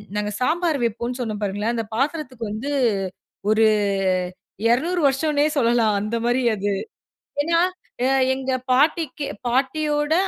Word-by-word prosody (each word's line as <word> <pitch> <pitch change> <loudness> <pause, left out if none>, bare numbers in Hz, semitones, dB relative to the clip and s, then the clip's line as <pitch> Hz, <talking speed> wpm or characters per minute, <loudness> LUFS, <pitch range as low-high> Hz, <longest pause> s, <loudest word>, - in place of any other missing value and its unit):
நாங்க 210 0 -1
சாம்பார் 325 +3 +1
வைப்போனு 235 +2 -2
சொன்னோம் 220 -4 -3
பாருங்களேன். 205 +3 -1
அந்த 230 - -1
பாத்திரத்திக்கு 270 -2 -2
வந்து 225 +7 -4 0.8
ஒரு 215 +1 +4 1.1
200 335 +9 +1
வருஷோனே 290 +2 +2
சொல்லலாம். 230 -4 +3
அந்த 215 +3 -2
மாதிரி 245 +2 +2
அது. 205 0 -1 0.7
ஏன்னா 335 +2 +2 0.5
அ - - +3 0.3
எங்க 265 0 -3 0.2
பாட்டிக்கு 295 +2 +2 0.2
பாட்டியோட 295 +4 +1
255 Hz, 115 wpm, -22 LUFS, 225-300 Hz, 1.1 s, ஒரு